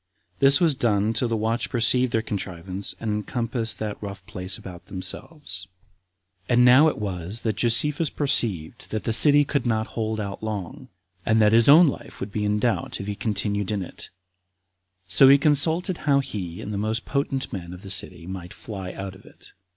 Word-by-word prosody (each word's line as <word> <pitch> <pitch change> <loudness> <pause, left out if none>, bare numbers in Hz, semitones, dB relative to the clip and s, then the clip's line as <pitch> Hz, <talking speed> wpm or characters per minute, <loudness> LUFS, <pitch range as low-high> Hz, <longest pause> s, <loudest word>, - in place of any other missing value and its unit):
This 140 +1 +6
was 165 -4 +4
done 110 -4 +1
till 115 +2 0
the 115 -1 -1
watch 115 +3 -1
perceived 125 +1 +2
their 110 -1 0
contrivance, 95 -2 -5
and 110 - -3
encompassed 115 +2 -2
that 105 -2 -5
rough 100 -2 -8
place 90 0 -4
about 90 -2 -11
themselves. 95 - -3 0.8
15. 120 - +2
And 125 - +6
now 130 +5 +7
it 155 - -1
was 95 +1 -5
that 110 -3 -1
Josephus 145 +7 +2
perceived 115 - -1
that 110 - -4
the 115 - 0
city 145 +4 +6
could 140 -2 -1
not 110 -1 0
hold 110 -1 -2
out 100 -2 -5
long, 105 -5 -6 0.4
and 110 0 +2
that 105 -1 +4
his 115 +3 +6
own 160 +5 +9
life 140 - -4
would 100 - -5
be 105 +1 -2
in 105 0 +1
doubt 115 +2 -1
if 100 - -5
he 105 - -3
continued 105 -2 -1
in 105 -3 -2
it; - - -9 1.0
so 130 +9 +6
he 140 - +8
consulted 160 +5 +2
how 140 -3 +2
he 95 -10 -5
and 105 - -6
the 100 - -2
most 110 +3 -2
potent 135 -2 -2
men 85 -3 -6
of 90 +2 -11
the 95 - -6
city 90 -3 0
might 90 -1 -8
fly 95 -4 -7
out 95 0 -6
of 95 - -16
it. - - -17
110 Hz, 195 wpm, -24 LUFS, 100-130 Hz, 1.0 s, own